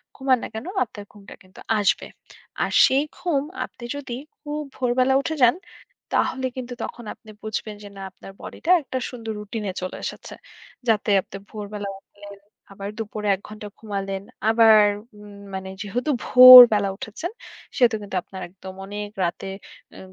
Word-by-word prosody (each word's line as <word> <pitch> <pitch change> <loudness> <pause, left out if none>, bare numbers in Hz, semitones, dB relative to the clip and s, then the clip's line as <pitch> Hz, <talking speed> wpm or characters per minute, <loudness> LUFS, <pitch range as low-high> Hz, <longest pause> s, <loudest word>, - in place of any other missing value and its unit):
ঘুমান 265 -1 +2
না - - -3
কেন 220 +2 -6 0.2
আপনার 205 -2 -11
ঘুমটা 205 -1 -13
কিন্তু 185 +1 -18 0.2
আসবে। 205 - +1 0.6
আর - - -2
সেই 270 +2 +2
ঘুম 325 -6 0 0.2
আপনি 240 - -16
যদি 275 -4 -6 0.2
খুব 300 0 -5 0.2
ভোরবেলা 255 +1 +2
উঠে 315 +3 -3
যান 245 +5 +6 0.6
তাহলে 260 0 0
কিন্তু 250 -1 -5
তখন 240 - -7
আপনি 220 - -19
বুঝবেন 215 0 -4
যে 205 - -9
না - - -8
আপনার 195 - -13
body - - -9
টা 345 - +3
একটা 260 - -5
সুন্দর 230 -3 -7
routine 210 +1 -6
এ - - -12
চলে 185 - -5
এসেছে। - - -7 0.6
যাতে 215 -1 +1
আপনি 190 - -13 0.2
ভোরবেলা 205 -1 -6
উঠলেন 200 0 -14 0.4
আবার 195 +1 -6
দুপুরে 215 -1 -4
১ 190 - -17
ঘণ্টা 210 0 -9
ঘুমালেন 195 -2 -4 0.3
আবার 225 -1 +6 0.4
উম 205 -1 -13 0.2
মানে 190 0 -6
যেহেতু 240 +8 -2
ভোরবেলা 250 -5 +10
উঠেছেন 275 - -6 0.5
সেহেতু 240 -3 +4
কিন্তু 200 -2 -7
আপনার 190 -1 -10
একদম 190 +1 -11
অনেক 205 +1 -6
রাতে 175 +2 -3 0.5
আ - - -11
215 Hz, 160 wpm, -23 LUFS, 200-250 Hz, 0.6 s, ভোরবেলা